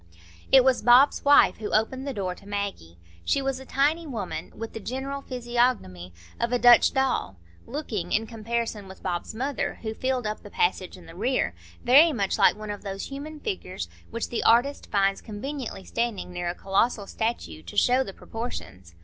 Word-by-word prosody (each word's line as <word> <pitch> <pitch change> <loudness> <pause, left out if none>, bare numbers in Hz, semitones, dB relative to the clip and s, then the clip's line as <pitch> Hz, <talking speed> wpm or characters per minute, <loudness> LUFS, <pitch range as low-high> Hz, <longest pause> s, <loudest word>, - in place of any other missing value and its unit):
It 265 -1 +8
was 260 -1 +3
Bob's 245 +5 +5
wife 285 0 +6
who 215 - -5
opened 260 +5 0
the - - -1
door 185 -3 -2
to 195 - -16
Maggie. 200 - -4 0.3
She - - +1
was 270 -1 -2
a 265 - -12
tiny 310 +4 +1
woman, 190 - -5
with 225 0 -7
the 225 - -5
general 265 +6 -4
physiognomy 240 - -1 0.3
of 235 0 0
a 245 - +3
Dutch 245 0 +7
doll, 265 - 0 0.3
looking, 220 - -4
in 220 +2 +1
comparison 225 -2 -3
with 190 - -13
Bob's 175 +4 -3
mother, 270 +3 -2
who 220 -1 -3
filled 255 0 -1
up 210 0 -3
the 205 - -11
passage 185 -1 0
in 180 - -14
the 165 - -12
rear, 230 - 0 0.3
very 295 +7 +7
much 200 -6 -1
like - - +6
one 215 0 -6
of 205 - -6
those 195 -1 -5
human 295 +3 -7
figures 410 -4 -4 0.2
which 230 - -4
the 235 - -2
artist 245 +5 +3
finds 195 -1 +1
conveniently 240 0 -6
standing 230 -6 -3
near 175 -1 -2
a 175 - -4
colossal 200 +3 +1
statue 195 - -3
to 85 +2 -10
show 255 +2 +4
the 195 - -7
proportions. 95 - -8
230 Hz, 185 wpm, -26 LUFS, 195-260 Hz, 0.3 s, It